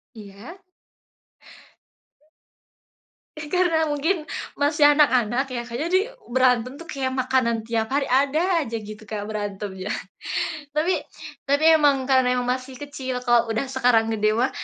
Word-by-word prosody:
Iya. 205 - -11 2.8
Karena 320 +2 0
mungkin 310 +4 0 0.4
masih 295 +1 +3
anak-anak 260 -3 +2
ya 235 - -2
kayaknya 245 +8 -3
di - - +4 0.4
berantem 250 -1 +3
tuh 335 - -11
kayak 265 -2 -2
makanan 255 -3 +1
tiap 225 -1 -1
hari, 280 -1 +1 0.2
ada 290 +4 0 0.2
aja 230 -4 -4
gitu 215 0 -10
kayak 205 -1 -4
berantemnya, 205 -2 -5 0.8
tapi 320 +5 +1 0.5
tapi 285 +2 +2
emang 280 -3 +2
karena 260 -1 +4
emang 250 0 -1
masih 260 +1 -9
kecil, 260 -3 -5
kalau 240 -1 +3
udah 225 +5 -1
sekarang 240 -3 +3
gede 215 0 +1
mah, 240 +4 +1
255 Hz, 125 wpm, -23 LUFS, 225-290 Hz, 2.8 s, di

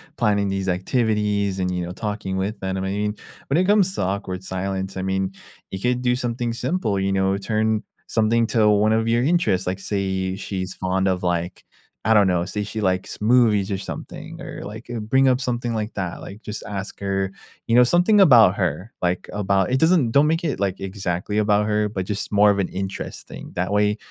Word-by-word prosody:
planning 100 -3 +1
these 95 -1 -2
activities 105 -1 0
and, 90 0 0
you 90 -1 -2
know, 90 - -6
talking 105 -1 -4
with 100 +3 -2
them 95 0 -2
and, 95 - -2
I - - -2
mean, 105 +1 -1 0.3
when 140 - +2
it 185 - +3
comes 195 -2 +3
to - - -1
awkward 95 -1 -3
silence, 95 +1 -3
I 95 - -3
mean, 95 0 -1 0.4
you 95 - -6
could 125 +2 0
do 125 -1 +2
something 120 -1 -2
simple, 125 - -1
you 95 0 0
know, 95 0 +1
turn 110 +1 0 0.2
something 115 +1 +2
to 110 -2 +5
one 105 +1 +3
of 115 +1 +1
your 120 +1 +3
interests, 130 - +1
like, 95 +1 -2
say, 95 -2 -2
she's 95 -2 -4
fond 95 +1 0
of, 90 0 -1
like, 90 0 -2 0.4
I 110 - +5
don't 105 -3 +5
know, 90 -1 +1
say 105 +3 -3
she 110 +1 -5
likes 95 -2 -1
movies 105 -3 +3
or 95 - -1
something 95 - -8
or, - - -7
like, 110 +3 -8 0.2
bring 135 +1 +4
up 130 +1 +3
something 120 -2 -2
like 110 -1 -3
that, 90 -4 -4
like, 100 +3 -10
just 105 - -5
ask 100 -1 -5
her, 95 -1 -1 0.3
you 115 - -1
know, 125 - +8
something 180 - +4
about 120 - +7
her, 90 +3 -2
like, 90 0 -1
about 100 -1 +1
it 130 - +2
doesn't 160 -7 +3
don't 140 +5 +4
make 165 +2 0
it, 145 - -2
like, 100 -2 -1
exactly 95 +1 -2
about 105 0 +2
her, 105 0 +1
but 95 -3 -3
just 105 +1 -3
more 105 0 +5
of 100 - -1
an 95 - +1
interest 95 0 -5
thing, - - -10
that 90 +2 -1
way, 105 +1 +2
105 Hz, 210 wpm, -22 LUFS, 95-115 Hz, 0.4 s, know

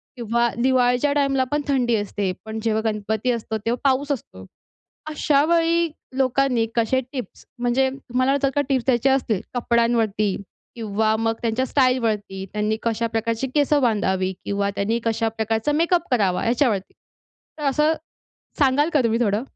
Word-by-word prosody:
किंवा 235 0 0
दिवाळीच्या 250 +2 +2
टाईमला 275 -2 +2
पण 295 0 +1
थंडी 250 -4 +2
असते. 205 -2 -2
पण 220 0 -5
जेव्हा 220 -1 +1
गणपती 215 +3 -1
असतो 220 -2 -3
तेव्हा 235 +2 0
पाऊस 280 +2 0
असतो. 95 - -6 0.7
अशावेळी 330 +3 +2 0.3
लोकांनी 260 -3 +2
कसे 235 +3 +2
टिप्स, 255 -8 -7
म्हणजे 245 +2 +2
तुम्हाला 260 0 0
जर 275 - +3
का 290 - +2
टिप्स 260 -3 +1
द्यायचे 255 0 +3
असतील, 245 -7 +1
कपड्यांवरती 230 -4 +1 0.4
किंवा 220 -1 0
मग 225 0 +1
त्यांच्या 235 +2 0
स्टाईलवरती, 225 -8 0
त्यांनी 210 +1 0
कशा 230 0 0
प्रकारची 230 +2 -1
केसं 290 0 +3
बांधावी 190 -5 +1
किंवा 200 0 -1
त्यांनी 220 +4 0
कशा 225 0 0
प्रकारचा 225 +4 -1
मेकअप 340 +3 +2
करावा 200 -7 +1
याच्यावरती. 235 -5 +1 0.7
तर 300 - -5
असं 300 +3 +2 0.7
सांगाल 285 +1 +3
का 295 - +5
तुम्ही 230 +1 +1
थोडं? 210 -1 +1
235 Hz, 145 wpm, -22 LUFS, 220-270 Hz, 0.7 s, का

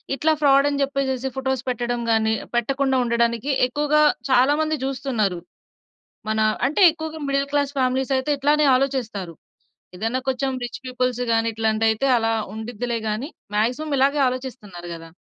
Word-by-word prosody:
ఇట్లా 315 +3 +2
ఫ్రాడ్ 275 -1 +5
అని 285 -1 -2
చెప్పేసేసి 270 -2 -1
ఫోటోస్ 265 -1 -1
పెట్టడం 240 0 -2
కానీ, 220 0 +2 0.2
పెట్టకుండా 265 +2 +1
ఉండడానికి 235 +2 0 0.2
ఎక్కువగా 295 +3 +1 0.3
చాలా 260 +3 +4
మంది 310 0 0
చూస్తున్నారు. 240 -9 -1 0.9
మన 220 0 0 0.3
అంటే 300 +8 -1
ఎక్కువగా 315 0 -7
మిడిల్ 275 0 0
క్లాస్ 285 -1 0
ఫ్యామిలీస్ 260 +1 0
అయితే 260 +3 -1
ఇట్లానే 295 +2 +2
ఆలోచిస్తారు. 245 -9 -1 0.6
ఏదైనా 225 +7 -2
కొంచెం 265 +1 0
రిచ్ 240 0 -5
పీపుల్స్‌గాని 245 -3 0
ఇట్లాంటివి 220 0 +1
అయితే 220 +5 0
అలా 225 -1 +1 0.2
ఉండిద్దిలే 235 +1 -4
గాని, 215 +7 -3 0.3
మాక్సిమం 245 +9 0
ఇలాగే 280 +2 +3
ఆలోచిస్తున్నారు 245 -9 -7
కదా! 165 0 -10
255 Hz, 140 wpm, -22 LUFS, 225-275 Hz, 0.9 s, ఫ్రాడ్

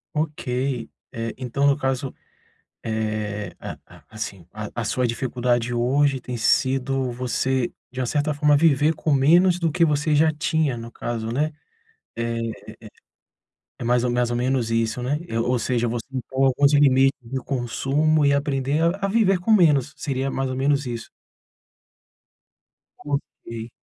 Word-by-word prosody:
Ok, 130 -5 -2 0.2
eh, 115 -1 -4
então 130 +2 0
no 140 0 +3
caso, 135 -1 -2 0.7
eh, 110 -2 -3
a - - -7
a - - -17
assim 100 -5 -6
a 105 -1 -6
a - - -2
sua 125 +4 0
dificuldade 120 0 -1
hoje 135 +3 +2
tem 125 -1 -6
sido 130 +1 +1
você 125 +1 -1 0.2
de 130 - -7
uma 130 - 0
certa 145 +4 0
forma 145 0 +3
viver 150 0 +4
com 155 - -1
menos 170 +6 +4
do 165 -2 +1
que 170 +2 +2
você 150 0 +1
já 160 +2 +4
tinha 155 -3 0
no 115 0 -8
caso, 115 -2 -4
né? 150 +6 0 0.6
Eh 115 0 -2
eh 115 0 -2
eh. 110 - -9 1.1
É - - -5
mais 120 0 +2
ou 125 - +1
mais 120 0 +1
ou - - -1
menos 125 -1 0
isso, 115 +1 0
né. 140 +4 0 0.3
Ou 125 0 +1
seja, 120 0 0
você 115 0 -3
impor 130 +1 -1
alguns 140 +2 +3
limites 135 -2 +5
do 130 +2 -5
consumo, 140 +4 +1
e 140 - +4
aprender 140 +1 0
a 185 +4 +1
a - - +1
viver 195 -3 +3
com 180 +6 -1
menos, 150 - +4
seria 135 -2 -2
mais 135 0 -2
ou 130 - -3
menos 140 +2 +1
isso. 120 -2 -5 1.9
Copiei. 120 -5 -5
130 Hz, 160 wpm, -23 LUFS, 120-145 Hz, 1.9 s, limites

